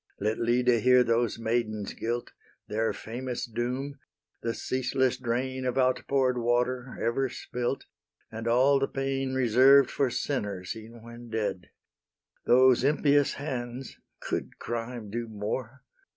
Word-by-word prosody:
Let 105 +2 -1
Lyde 120 0 +3
hear 125 +1 +6
those 115 -1 +1
maidens' 110 -3 -1
guilt, 120 +1 -3 0.4
Their 110 +1 0
famous 125 +2 -5
doom, 125 +5 -3 0.4
the 115 0 -2
ceaseless 130 0 0
drain 130 +2 -2
Of 125 0 -1
outpour'd 130 0 +2
water, 125 +2 0
ever 130 +3 0
spilt, 125 +2 -3 0.5
And 115 +1 -5
all 130 +4 +4
the 135 - +1
pain 135 -1 -2
Reserved 130 +2 +6
for 135 - +1
sinners, 100 -9 -3
e'en 115 +1 -11
when 120 0 -11
dead: 105 -5 -3 0.8
Those 130 0 +6
impious 145 0 +3
hands, 130 -3 -5 0.2
(could - - -4
crime 115 -2 -5
do 120 +1 -3
more?) 110 +5 -5
120 Hz, 125 wpm, -28 LUFS, 115-130 Hz, 0.8 s, hear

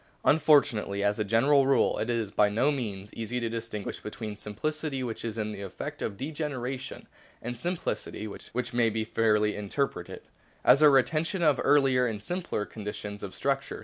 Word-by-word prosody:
Unfortunately, 130 -10 +3
as 105 +1 +1
a - - +2
general 135 +7 +4
rule, 135 -4 +3
it 110 - -2
is 115 -4 -1
by 105 0 +3
no 120 +8 +2
means 105 -7 -4
easy 115 +2 -3
to 115 -1 -2
distinguish 115 -2 -5
between 105 0 -6
simplicity 135 +7 -3
which 115 -3 -4
is 115 -2 -3
the 105 -2 -4
effect 95 -2 -6
of 100 - -3
degeneration 135 -2 -4 0.3
and 120 +1 -5
simplicity 120 - -3
which 120 +4 -5
may 120 -1 +3
be 110 0 -2
fairly 105 -2 +2
interpreted 105 +7 -3 0.4
as 140 - +7
a 150 - +9
retention 155 +7 +2
of 150 -3 +4
earlier 135 -3 +4
and 105 -2 -4
simpler 175 - -2
conditions 105 -1 -6
of 100 - -6
structure. 140 0 -1
115 Hz, 165 wpm, -28 LUFS, 105-140 Hz, 0.4 s, a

